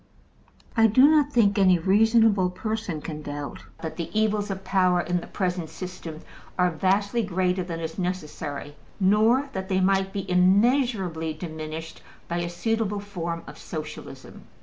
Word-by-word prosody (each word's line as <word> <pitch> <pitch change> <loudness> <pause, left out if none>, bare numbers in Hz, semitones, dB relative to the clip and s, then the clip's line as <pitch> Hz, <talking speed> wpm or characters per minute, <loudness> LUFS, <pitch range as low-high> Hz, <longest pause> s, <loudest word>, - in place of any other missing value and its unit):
I 225 -1 +6
do 255 +6 +6
not 300 -2 +4
think 210 -6 +3
any 185 -2 +5
reasonable 205 +1 +4
person 200 -4 -4
can 155 -1 -6
doubt 145 -1 -6 0.2
that 160 - -5
the 170 - -4
evils 210 -1 +1
of 190 0 -4
power 185 -2 +2
in 175 +1 -1
the - - -10
present 180 -4 -2
system 175 -4 -8 0.4
are 180 -1 +3
vastly 200 +7 +1
greater 185 -2 0
than 170 -2 -5
is 160 +2 -5
necessary, 150 -5 -4 0.2
nor 220 +8 +3
that 190 0 -4
they 190 -1 +2
might 195 0 +2
be 195 -1 -4
immeasurably 185 - +2
diminished 160 0 -7 0.3
by 170 - -2
a 175 0 -2
suitable 210 +3 -1
form 170 -4 -5
of - - -11
Socialism. 155 -2 -8
185 Hz, 150 wpm, -25 LUFS, 170-210 Hz, 0.4 s, I